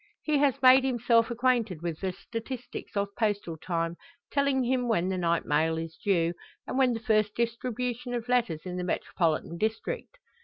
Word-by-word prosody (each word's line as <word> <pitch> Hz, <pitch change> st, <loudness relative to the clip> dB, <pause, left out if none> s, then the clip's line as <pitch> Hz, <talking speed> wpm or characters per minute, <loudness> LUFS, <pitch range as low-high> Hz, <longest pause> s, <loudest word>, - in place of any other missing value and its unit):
He 300 Hz, -2 st, +2 dB
has 275 Hz, -2 st, +2 dB
made 260 Hz, +1 st, +8 dB
himself 235 Hz, -3 st, +3 dB
acquainted 235 Hz, -8 st, +1 dB
with 165 Hz, -2 st, -3 dB
the 190 Hz, -1 st, -1 dB
statistics 230 Hz, +3 st, -7 dB
of 200 Hz, 0 st, -1 dB
postal 205 Hz, -6 st, 0 dB
time, 165 Hz, +1 st, -2 dB, 0.3 s
telling 280 Hz, -2 st, +2 dB
him 250 Hz, 0 st, +1 dB
when 185 Hz, -6 st, +1 dB
the 190 Hz, -, -1 dB
night 170 Hz, -1 st, +1 dB
mail 160 Hz, +2 st, +2 dB
is 165 Hz, 0 st, -5 dB
due, 170 Hz, -4 st, +2 dB, 0.3 s
and -, -, -4 dB
when 260 Hz, -2 st, +4 dB
the 225 Hz, -, -3 dB
first 215 Hz, -1 st, +1 dB
distribution 245 Hz, +1 st, -2 dB
of 235 Hz, 0 st, -4 dB
letters 235 Hz, -11 st, +1 dB
in 180 Hz, 0 st, -4 dB
the 180 Hz, -, -2 dB
metropolitan 170 Hz, -1 st, -1 dB
district. 220 Hz, -, -3 dB
225 Hz, 175 wpm, -28 LUFS, 175-250 Hz, 0.3 s, made